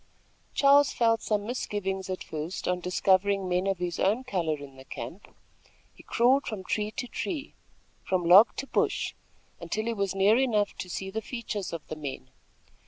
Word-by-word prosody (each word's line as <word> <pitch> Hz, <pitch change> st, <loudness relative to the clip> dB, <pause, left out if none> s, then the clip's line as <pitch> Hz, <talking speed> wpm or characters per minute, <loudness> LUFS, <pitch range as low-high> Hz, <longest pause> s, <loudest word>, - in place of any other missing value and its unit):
Charles 280 Hz, 0 st, +6 dB
felt 230 Hz, -1 st, +2 dB
some 210 Hz, -1 st, -1 dB
misgivings 195 Hz, -5 st, -3 dB
at 185 Hz, -, -3 dB
first 160 Hz, +3 st, -5 dB
on 180 Hz, 0 st, +1 dB
discovering 190 Hz, +2 st, +2 dB
men 180 Hz, +1 st, 0 dB
of 195 Hz, -1 st, +1 dB
his 175 Hz, -1 st, -3 dB
own 215 Hz, +7 st, +2 dB
color 175 Hz, -10 st, -1 dB
in 140 Hz, -2 st, -11 dB
the 130 Hz, -, -12 dB
camp. 135 Hz, -, -8 dB, 0.7 s
He -, -, -16 dB
crawled 260 Hz, +4 st, +2 dB
from 210 Hz, -4 st, -4 dB
tree 210 Hz, +2 st, -1 dB
to 245 Hz, +4 st, -5 dB
tree, 305 Hz, +2 st, -4 dB, 0.5 s
from 185 Hz, -2 st, 0 dB
log 190 Hz, +7 st, +8 dB
to 275 Hz, -, -4 dB
bush, -, -, 0 dB, 0.5 s
until 215 Hz, +1 st, -3 dB
he 230 Hz, -, 0 dB
was 200 Hz, -3 st, -2 dB
near 205 Hz, +5 st, +4 dB
enough 215 Hz, -6 st, +1 dB
to 180 Hz, -, -5 dB
see 190 Hz, +2 st, -4 dB
the 220 Hz, +2 st, -3 dB
features 215 Hz, -5 st, -5 dB
of 165 Hz, -2 st, -7 dB
the 155 Hz, -, -5 dB
men. 135 Hz, -3 st, -7 dB
195 Hz, 175 wpm, -28 LUFS, 180-225 Hz, 0.7 s, log